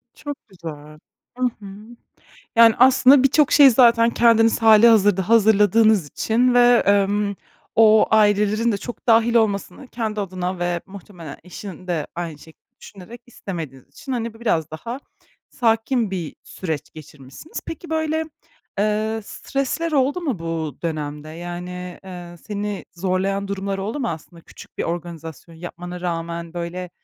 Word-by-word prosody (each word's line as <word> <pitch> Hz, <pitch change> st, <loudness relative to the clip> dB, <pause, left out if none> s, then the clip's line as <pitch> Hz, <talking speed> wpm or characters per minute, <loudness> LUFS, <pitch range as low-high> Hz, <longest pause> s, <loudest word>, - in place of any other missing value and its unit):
Çok 290 Hz, -1 st, -8 dB
güzel. 155 Hz, -4 st, -10 dB, 0.4 s
Hı 255 Hz, -, -3 dB, 0.2 s
hı. 205 Hz, -, -12 dB, 0.9 s
Yani, 230 Hz, -1 st, +7 dB
aslında 260 Hz, +2 st, +6 dB
birçok 280 Hz, +2 st, +3 dB
şeyi 285 Hz, -2 st, +8 dB
zaten 235 Hz, -1 st, +5 dB
kendiniz 230 Hz, -1 st, +3 dB
hâlihazırda 210 Hz, -4 st, +5 dB
hazırladığınız 215 Hz, -3 st, +4 dB
için 245 Hz, -, +1 dB
ve, 245 Hz, -1 st, +5 dB
emm, 200 Hz, +1 st, +2 dB, 0.4 s
o 220 Hz, -1 st, +5 dB
ailelerin 215 Hz, +1 st, +3 dB
de -, -, -1 dB
çok 240 Hz, +4 st, -9 dB
dâhil 230 Hz, 0 st, +4 dB
olmasını 220 Hz, +2 st, 0 dB
kendi 220 Hz, -3 st, -3 dB
adına 185 Hz, -1 st, -4 dB
ve 175 Hz, 0 st, -1 dB
muhtemelen 185 Hz, -6 st, -11 dB
eşinin 185 Hz, 0 st, -10 dB
de 165 Hz, -5 st, -2 dB
aynı 170 Hz, -3 st, -5 dB
şek 160 Hz, +1 st, -17 dB, 0.2 s
düşünerek 205 Hz, +5 st, -12 dB
istemediğiniz 160 Hz, -, -8 dB
için, 205 Hz, -, -8 dB
hani, 230 Hz, -2 st, -3 dB
bi 225 Hz, -, -17 dB
biraz 165 Hz, -10 st, 0 dB
daha 230 Hz, -, -7 dB, 0.5 s
sakin 225 Hz, -1 st, 0 dB
bir 175 Hz, -5 st, -5 dB
süreç 160 Hz, -6 st, -6 dB
geçirmişsiniz. 150 Hz, -, -11 dB
Peki, 325 Hz, +1 st, -8 dB
böyle, 315 Hz, 0 st, -1 dB, 0.5 s
eee, 215 Hz, +2 st, 0 dB
stresler 275 Hz, +8 st, -3 dB
oldu 280 Hz, +4 st, +1 dB
mu 280 Hz, -, -2 dB
bu 165 Hz, -2 st, -4 dB
dönemde, 150 Hz, -2 st, -4 dB
yani, 175 Hz, +2 st, -7 dB
eee, 175 Hz, -2 st, -9 dB
seni 205 Hz, -1 st, -4 dB
zorlayan 195 Hz, +2 st, -1 dB
durumlar 195 Hz, 0 st, -3 dB
oldu 215 Hz, +9 st, -4 dB
mu? 240 Hz, -, -1 dB
Aslında 165 Hz, +1 st, -8 dB
küçük -, -, -16 dB
bir -, -, 0 dB
organizasyon 165 Hz, -1 st, -7 dB
yapmana 175 Hz, +1 st, -8 dB
rağmen, 170 Hz, -1 st, -4 dB
böyle, 175 Hz, +1 st, -5 dB
200 Hz, 140 wpm, -21 LUFS, 175-230 Hz, 0.9 s, şeyi